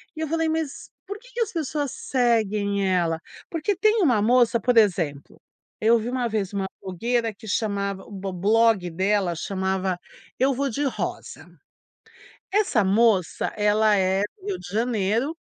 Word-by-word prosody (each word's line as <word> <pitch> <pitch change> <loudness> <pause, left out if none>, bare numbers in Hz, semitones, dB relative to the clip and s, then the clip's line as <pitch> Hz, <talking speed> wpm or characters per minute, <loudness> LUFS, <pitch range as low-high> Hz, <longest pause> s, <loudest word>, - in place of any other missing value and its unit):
e 315 - -8
eu 315 - -1
falei: 325 +1 0
"Mas, 315 -3 -3 0.2
por 405 +2 -6
que - - -18
que 470 - -2
as 445 - 0
pessoas 295 -3 -2
seguem 210 -6 0
ela?". 170 -3 +1 0.3
Porque 335 +5 -1
tem 430 +3 +3
uma 245 - +3
moça 240 +1 +4
por 250 -1 +1
exemplo, 170 -9 +1 0.4
eu 230 +2 +5
vi 230 +3 -4
uma 250 -1 -1
vez 205 -3 -2
uma 195 -1 -1 0.2
blogueira 230 +5 -1
que 215 +2 -14
chamava 200 -2 -1
o - - -16
bo 195 -1 -5
blog 210 0 +3
dela 190 0 0
chamava, 190 0 -2 0.4
Eu 265 +2 +3
Vou 275 +2 -1
de 280 +6 -2
Rosa. 265 - -4 1.0
Essa 380 - +2
moça 195 -2 +2
ela 210 0 +3
é 190 +1 +2 0.2
Rio 395 -2 -3
de 180 - -10
Janeiro 230 - 0
220 Hz, 160 wpm, -24 LUFS, 195-265 Hz, 1.0 s, eu